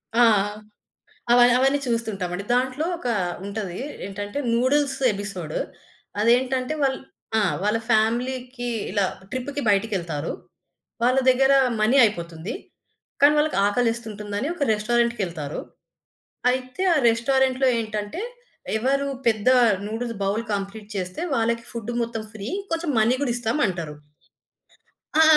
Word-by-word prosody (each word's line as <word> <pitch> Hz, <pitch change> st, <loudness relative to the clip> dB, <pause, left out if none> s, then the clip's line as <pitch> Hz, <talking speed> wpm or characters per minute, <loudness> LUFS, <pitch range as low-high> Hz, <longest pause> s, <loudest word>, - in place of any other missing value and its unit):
ఆ! 240 Hz, -, +6 dB, 1.1 s
అవ 245 Hz, -, +6 dB, 0.2 s
అవన్నీ 270 Hz, +2 st, +3 dB
చూస్తుంటామండి. 200 Hz, -6 st, -2 dB
దాంట్లో 260 Hz, +5 st, 0 dB
ఒక 330 Hz, -, -8 dB, 0.4 s
ఉంటది. 200 Hz, -3 st, -4 dB, 0.3 s
ఏంటంటే 205 Hz, +5 st, -5 dB, 0.2 s
నూడిల్స్ 270 Hz, +3 st, +2 dB
ఎపిసోడ్. 195 Hz, -6 st, -5 dB, 0.6 s
అదేంటంటే 255 Hz, +4 st, +2 dB
వాళ్ళు 265 Hz, -1 st, +2 dB, 0.4 s
ఆ! -, -, +3 dB, 0.2 s
వాళ్ళ 210 Hz, +2 st, +2 dB
ఫ్యామిలీకి 245 Hz, +3 st, 0 dB, 0.2 s
ఇలా 200 Hz, 0 st, +1 dB, 0.3 s
ట్రిప్‌కి 280 Hz, +4 st, -3 dB
బయటికెళ్తారు. 190 Hz, -7 st, 0 dB, 0.7 s
వాళ్ళ 250 Hz, +2 st, +3 dB
దగ్గర 265 Hz, +1 st, +5 dB, 0.3 s
మనీ 220 Hz, +5 st, +4 dB
అయిపోతుంది. 170 Hz, -1 st, -3 dB, 0.7 s
కానీ 285 Hz, +1 st, +7 dB
వాళ్ళకి 300 Hz, -8 st, +1 dB
ఆకలేస్తుంటుందని 220 Hz, 0 st, -1 dB
ఒక 345 Hz, -, -6 dB
రెస్టారెంటుకెళ్తారు. 210 Hz, -9 st, -1 dB, 0.9 s
అయితే 255 Hz, +5 st, -3 dB
ఆ -, -, +2 dB
రెస్టారెంటులో 260 Hz, +3 st, +2 dB
ఏంటంటే 215 Hz, -, -4 dB, 0.6 s
ఎవరు 275 Hz, +4 st, +1 dB, 0.2 s
పెద్ద 220 Hz, 0 st, +2 dB, 0.4 s
నూడిల్స్ 230 Hz, +2 st, -4 dB
బౌల్ 200 Hz, +3 st, 0 dB
కంప్లీట్ 200 Hz, +1 st, -5 dB
చేస్తే 185 Hz, 0 st, -4 dB
వాళ్ళకి 230 Hz, 0 st, 0 dB
ఫుడ్ 235 Hz, 0 st, -5 dB
మొత్తం 230 Hz, -1 st, -3 dB
ఫ్రీ. 210 Hz, 0 st, -6 dB, 0.2 s
కొంచెం 330 Hz, -1 st, -1 dB
మనీ 235 Hz, +4 st, +3 dB
గూడా 260 Hz, -4 st, +1 dB
ఇస్తాం 240 Hz, +3 st, -1 dB
అంటారు. 170 Hz, -6 st, -4 dB, 1.2 s
ఆ! 315 Hz, -, +6 dB
230 Hz, 110 wpm, -24 LUFS, 205-255 Hz, 1.2 s, కానీ